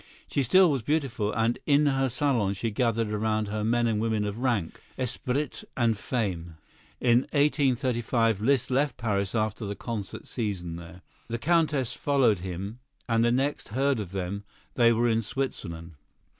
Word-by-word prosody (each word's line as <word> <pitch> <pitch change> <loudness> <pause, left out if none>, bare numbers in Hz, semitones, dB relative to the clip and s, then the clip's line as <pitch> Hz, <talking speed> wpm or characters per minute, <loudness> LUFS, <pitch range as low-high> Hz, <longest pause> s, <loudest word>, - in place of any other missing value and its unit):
She 140 - 0
still 180 +7 +5
was 135 -3 0
beautiful, 125 -6 0
and 115 +2 0
in 145 0 +4
her 135 -2 +2
salon 120 -6 +1
she 115 +3 -2
gathered 115 -1 0
around 110 0 0
her 105 0 -2
men 120 +2 +2
and 110 -2 +1
women 110 -2 0
of 105 +2 -4
rank, 120 -10 -1 0.2
esprit 130 +3 -2
and 115 -3 +3
fame. 95 -8 -3 0.4
In 120 -1 +4
1835 125 -6 +2
Liszt 130 +2 +2
left 140 +2 +1
Paris 100 -3 -1
after 110 0 -1
the 100 0 -3
concert 110 -4 -5
season 95 -8 -3
there. 85 +1 -11 0.2
The 115 - -2
Countess 150 -3 +1
followed 130 -9 +2
him, 95 +5 -5 0.3
and 115 -1 +2
the 120 - +3
next 135 +4 0
heard 135 +3 +1
of 95 -4 -5
them 95 +1 -3 0.3
they 120 -2 +5
were 115 +1 +2
in 115 -1 +2
Switzerland. 90 -10 -4
115 Hz, 160 wpm, -27 LUFS, 105-130 Hz, 0.4 s, still